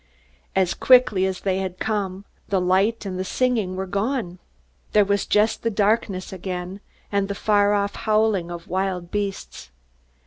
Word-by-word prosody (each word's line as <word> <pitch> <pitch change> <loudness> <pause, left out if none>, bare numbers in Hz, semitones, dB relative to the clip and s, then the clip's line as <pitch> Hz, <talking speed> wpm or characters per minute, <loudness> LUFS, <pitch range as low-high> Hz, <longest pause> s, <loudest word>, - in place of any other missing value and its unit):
As 190 -2 +2
quickly 245 -7 +4
as 190 -1 -4
they 190 -1 0
had 185 -1 -4
come, 200 -2 -2 0.2
the 195 - +2
light 195 +5 +1
and 185 -2 -4
the - - 0
singing 220 -3 0
were 190 +1 -3
gone. 200 -1 -2 0.5
There 210 -1 +5
was 200 0 0
just 210 +2 +2
the 230 - 0
darkness 200 -3 0
again, 180 +1 -5 0.3
and 200 -1 +1
the 200 - -4
far 205 0 +3
off 200 0 0
howling 215 -5 +1
of 170 -1 -8
wild 185 -1 -2
beasts. 200 - -4
195 Hz, 160 wpm, -23 LUFS, 185-210 Hz, 0.5 s, There